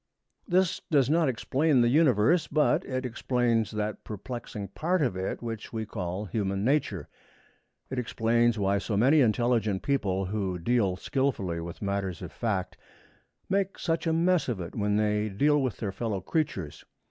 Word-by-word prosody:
This 185 -1 +2
does 140 -5 +3
not 160 -2 +3
explain 135 +3 +2
the 120 - +4
Universe, 145 - +4
but 150 0 +2
it 130 0 -3
explains 120 -2 0
that 105 0 -3
perplexing 105 -2 -6
part 170 - 0
of 125 -9 0
it 95 +5 -3
which 115 -2 -5
we 110 -1 -3
call 95 -1 -4
Human 100 0 -2
Nature. 145 +3 0 0.8
It 130 - -1
explains 115 0 +1
why 100 0 +1
so 100 +1 -2
many 140 +8 +5
intelligent 115 -4 +1
people, 100 -9 0
who 95 -2 -2
deal 100 0 +1
skillfully 100 -6 -1
with 85 +4 -7
matters 100 -3 -2
of - - -7
fact, 95 -6 -2 0.7
make 195 0 0
such 165 0 -1
a - - +3
mess 170 -1 +2
of 115 -6 -2
it 85 -1 -6
when 105 -1 0
they 105 0 +1
deal 145 +9 +2
with 130 -4 -2
their 105 -3 -3
fellow 105 0 -3
creatures. 95 - -3
115 Hz, 160 wpm, -28 LUFS, 100-135 Hz, 0.8 s, many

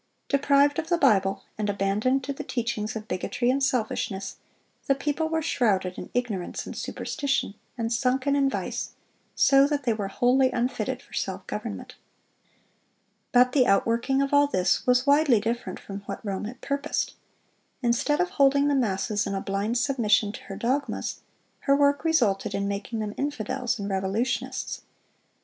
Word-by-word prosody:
Deprived 280 +1 +3
of 325 0 -4
the 345 - +3
Bible, 195 - +3 0.2
and 210 -1 0
abandoned 205 +7 +1
to 280 +2 -3
the - - -6
teachings 230 -3 -3
of 220 0 -6
bigotry 240 +6 0
and 275 +1 0
selfishness, 215 -6 -1 0.5
the 275 - +4
people 295 +3 -1
were 320 0 -1
shrouded 195 - +1
in - - -8
ignorance 220 -8 -2
and - - -7
superstition, 280 -8 -2 0.2
and 230 0 -1
sunken 260 +3 +1
in 275 -1 +3
vice, - - -4 0.4
so 275 0 +5
that 290 -1 -1
they 235 -3 +2
were 205 -2 -3
wholly 255 +5 +3
unfitted 245 +1 -2
for - - -20
self - - -3
government. - - -6 1.3
But 250 0 +5
the 255 -2 +3
outworking 235 +7 +2
of 275 - -3
all 285 0 +6
this 185 -6 +1
was 250 +1 +4
widely 285 -4 +5
different 230 +3 -3
from 200 0 -7
what - - -6
Rome 195 0 -3
had 250 +4 -8
purposed. 280 +1 -2 0.7
Instead 240 +6 +1
of 360 0 +1
holding 280 +1 +4
the - - +2
masses 210 -4 0
in 195 - -2
a - - -1
blind 200 +5 -1
submission 230 -5 +2
to - - -10
her 195 - -7
dogmas, 265 +7 -2 0.5
her 275 - +6
work 285 0 +3
resulted 220 -11 +1
in 200 0 -1
making 200 +3 -4
them 210 -1 -3
infidels 255 -3 -2
and 200 -2 -4
revolutionists. 230 +7 -2
245 Hz, 165 wpm, -26 LUFS, 210-280 Hz, 1.3 s, all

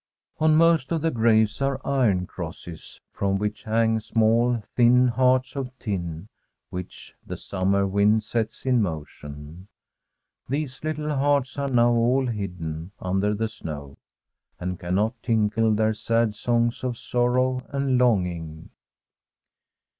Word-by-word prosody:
On 155 0 +4
most 165 -3 +4
of 165 -2 0
the 165 - +2
graves 110 0 +2
are 135 -1 0
iron 110 -10 +2
crosses, 85 -2 -8
from 100 0 0
which 105 +3 -3
hang 110 0 +2
small, 115 +1 +2
thin 125 +1 +5
hearts 130 +1 +2
of 135 -2 -3
tin, 85 -5 -4 0.4
whicK 90 0 -8
the - - -6
summer 100 +1 0
wind 100 +3 +3
sets 115 0 -3
in 125 -3 +3
motion. 75 0 -6 0.8
These 140 -1 -3
little 150 -1 -2
hearts 140 0 +1
are 140 0 -1
now 120 -2 +4
all 120 +3 +2
hidden 90 -6 -5
under 95 +3 0
the 110 +2 -1
snow, 75 -10 -8 0.6
and 90 0 -4
cannot 95 +6 -1
tinkle 110 -1 +2
their 110 +1 +2
sad 115 +1 0
songs 120 +2 0
of 125 -2 -2
sorrow 125 +2 +1
and 135 -2 0
longing. 90 -9 0
110 Hz, 130 wpm, -25 LUFS, 95-125 Hz, 0.8 s, thin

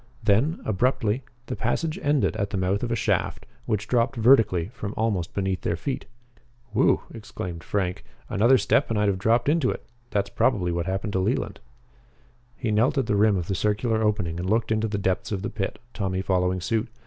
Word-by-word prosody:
Then, 115 - +2
abruptly, 110 +2 +1 0.2
the 130 - -4
passage 165 -1 -1
ended 145 -5 +2
at 100 -1 -1
the 100 - -3
mouth 95 +2 0
of 120 - -2
a - - +2
shaft, - - -1 0.2
which 105 -1 -1
dropped 120 +1 +1
vertically 110 -7 +4
from 110 -4 -6
almost 100 -7 -1
beneath 95 -2 -1
their - - 0
feet. 135 -3 -4 0.7
"Whew!" 110 - +3
exclaimed 90 -6 -7
Frank. 95 -3 -2 0.2
"Another 120 +6 +4
step 140 - +2
and 115 - 0
I'd 105 0 +3
have 95 -1 -1
dropped 115 +6 +2
into 150 -4 +3
it. - - -4 0.2
That's 100 -1 -1
probably 95 -8 +1
what 85 0 -2
happened 95 +2 -2
to 95 - +1
Leland." 95 - -1 1.0
He 115 - -2
knelt 120 +8 +2
at 135 - +2
the 105 - 0
rim 105 -1 +4
of 85 - -2
the 100 - -1
circular 105 +3 0
opening 100 -6 0
and 90 +1 -2
looked 110 +1 +1
into 110 0 +1
the 105 -1 -2
depths 95 0 -1
of 100 -2 -2
the - - -3
pit, 95 - -3 0.2
Tommy 95 -2 -2
following 90 -1 +1
suit. 110 +5 0
105 Hz, 195 wpm, -25 LUFS, 95-115 Hz, 1.0 s, vertically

